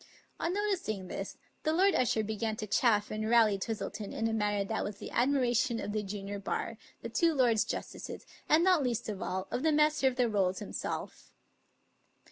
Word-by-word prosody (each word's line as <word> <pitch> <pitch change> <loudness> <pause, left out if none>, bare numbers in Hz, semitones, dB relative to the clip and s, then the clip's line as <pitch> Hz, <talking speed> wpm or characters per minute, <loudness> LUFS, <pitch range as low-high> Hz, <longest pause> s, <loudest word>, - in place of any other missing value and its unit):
On 335 - 0
noticing 360 - -2
this. - - -5 0.3
Lord 360 +5 +3
Usher 230 -3 +2
began 220 +1 -2
to 215 - -4
chaff 210 0 +2
and 215 0 -2
rally 225 -4 +5
Twis 225 +3 -2
tleton 205 0 -5
in 225 - -1
a 225 - -1
manner 205 -2 +1
that 220 +2 -2
was 205 -1 -5
the - - -8
admiration 245 -2 +2
of - - -4
the 215 0 -1
junior 200 0 -5
bar, 220 +3 -3 0.2
the 230 - -4
two 330 +7 +2
lords 235 -5 +4
justices, - - -6 0.2
and, 315 +3 +5
not 365 -4 +5
least 245 -4 -1
of 205 -3 -5
all, 190 +1 -3
of - - -1
the 315 +1 +3
Master 300 -2 +3
of 260 - +1
the 250 -1 +2
Rolls 190 -4 +1
himself. 210 - -5
225 Hz, 190 wpm, -31 LUFS, 205-265 Hz, 0.3 s, rally